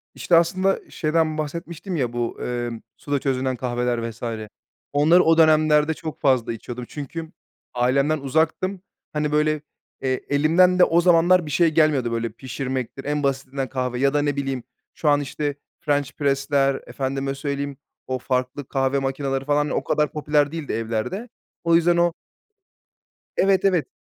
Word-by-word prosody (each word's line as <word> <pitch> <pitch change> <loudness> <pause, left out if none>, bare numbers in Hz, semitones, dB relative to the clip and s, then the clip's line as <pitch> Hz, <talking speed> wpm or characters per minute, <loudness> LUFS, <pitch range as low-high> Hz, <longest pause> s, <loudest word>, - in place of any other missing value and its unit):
İşte, 175 - +2
aslında 185 +3 +3
şeyden 155 -1 0
bahsetmiştim 170 +4 -5
ya, 125 -6 -1
bu, 120 -1 -3
emm, 120 -1 -3 0.2
suda 145 -1 -2
çözünen 130 -1 -1
kahveler 120 -1 -1
vs. 115 0 -13 0.7
Onları 155 +5 +5
o 165 0 +4
dönemlerde 155 -1 +4
çok 155 0 -7
fazla 130 -4 +2
içiyordum. 120 +2 -7
Çünkü 160 +3 -7 0.4
ailemden 135 +5 +2
uzaktım. 160 +7 0 0.3
Hani, 150 0 -1
böyle, 150 0 +1 0.4
eee, 130 -1 -1
elimden 170 +6 +4
de - - +8
o 170 0 +4
zamanlar 175 0 +4
bir 150 - -6
şey 170 +2 +4
gelmiyordu. 150 -6 +2
Böyle, 115 0 -1
pişirmektir, 130 +2 -5
en 145 0 -1
basitinden 135 -1 -2
kahve 125 -2 -2
ya 135 +1 +2
da, 145 - +2
ne 145 -1 0
bileyim, 135 -3 -3 0.3
şu 150 - 0
an, 145 0 +4
işte, 145 +1 -3 0.2
French 145 -2 0
Press'ler, 140 -1 +1
efendime 135 0 -3
söyleyeyim, 140 0 -3 0.3
o 130 0 -2
farklı 130 +2 -2
kahve 135 0 +1
makineleri 135 0 -2
falan 150 0 +1
o - - -1
kadar 150 0 +1
popüler 150 -1 +1
değildi 160 -3 -4
evlerde. 115 - -3 0.3
O 170 -1 +4
yüzden 170 +1 +4
o 170 0 +3 1.2
Evet, 195 0 +3
evet, 180 -5 +2
145 Hz, 150 wpm, -23 LUFS, 130-160 Hz, 1.2 s, de